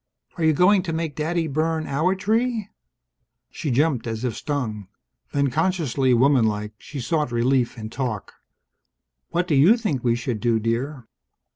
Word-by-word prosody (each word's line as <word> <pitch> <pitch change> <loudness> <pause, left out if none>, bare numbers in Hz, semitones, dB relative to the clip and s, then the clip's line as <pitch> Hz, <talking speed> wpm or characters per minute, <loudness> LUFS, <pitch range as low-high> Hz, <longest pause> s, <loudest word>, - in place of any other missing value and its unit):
"Are 170 - -3
you 160 0 +4
going 185 +5 +4
to 170 -3 -4
make 160 -2 -3
Daddy 165 +2 -1
burn 160 +2 -1
our 160 +7 +1
tree?" 220 +2 0 0.8
She 150 - -4
jumped 135 -1 +1
as 115 +1 -4
if 125 -3 -1
stung. 115 -10 -3 0.4
Then, 140 -2 +1
consciously 155 -5 +1
womanlike, 115 -5 +2
she 145 - -8
sought 150 +1 -1
relief 120 +1 +1
in 110 -1 -7
talk. 120 -7 -4 1.0
"What 175 +2 0
do 160 - 0
you 160 - +6
think 155 - -2
we 120 -2 +2
should 120 -2 -3
do, 115 +1 +1
dear?" 120 +3 -2
140 Hz, 155 wpm, -23 LUFS, 120-165 Hz, 1.0 s, you